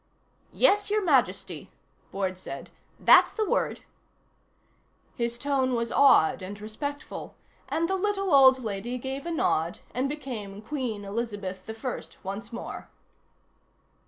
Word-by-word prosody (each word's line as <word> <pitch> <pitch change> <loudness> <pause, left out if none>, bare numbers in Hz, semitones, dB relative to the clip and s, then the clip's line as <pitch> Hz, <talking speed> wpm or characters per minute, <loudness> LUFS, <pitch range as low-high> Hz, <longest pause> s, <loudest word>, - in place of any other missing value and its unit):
"Yes, 410 -4 +3
Your 420 0 +1
Majesty," 195 - +1 0.4
Boyd 190 -1 -2
said. 140 -7 -8 0.3
"That's - - +7
the 435 -2 -1
word." - - 0 1.3
His 235 0 -2
tone 265 -1 +1
was 235 0 -1
awed 240 - +5
and 200 +2 -7
respectful, 285 +8 -6 0.3
and 330 +1 +1
the 380 - -1
little 390 -2 0
old 265 -2 +7
lady 220 +3 -3
gave 265 +5 -5
a - - -2
nod 170 - +1 0.2
and 260 +2 0
became 220 -9 -6
Queen 230 -6 -3
Elizabeth 200 -3 -4
I 225 +3 -4 0.2
once 200 +4 -6
more. 235 - -7
240 Hz, 125 wpm, -27 LUFS, 200-285 Hz, 1.3 s, That's